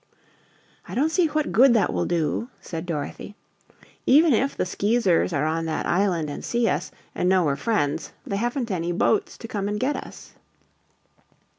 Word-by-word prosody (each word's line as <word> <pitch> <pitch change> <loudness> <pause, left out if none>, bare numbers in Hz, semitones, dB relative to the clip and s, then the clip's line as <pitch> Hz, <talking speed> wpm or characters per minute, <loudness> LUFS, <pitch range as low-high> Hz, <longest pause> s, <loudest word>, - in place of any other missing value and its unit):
"I - - -7
don't 300 +5 +2
see 345 0 +3
what 305 0 -1
good 250 +1 +6
that 220 - +2
will 90 -1 -1
do," 170 +8 -1
said 165 +1 -6
Dorothy. 165 +5 -5 0.7
"Even 305 +2 +6
if 275 +5 0
the - - 0
Skeezers 200 -2 +1
are 150 -2 0
on 165 +1 -1
that 155 - -2
island 175 -4 +1
and 145 - -6
see 235 -1 0
us, - - -1 0.2
and 180 - 0
know 185 -1 +4
we're 140 -2 +1
friends, 150 -8 -1
they 200 - -2
haven't 240 +1 -2
any 175 -2 -1
boats 185 +4 +1
to 230 - -8
come 200 -3 -3
and 210 0 -2
get 275 +5 0
us." - - -9
200 Hz, 175 wpm, -24 LUFS, 165-240 Hz, 0.7 s, good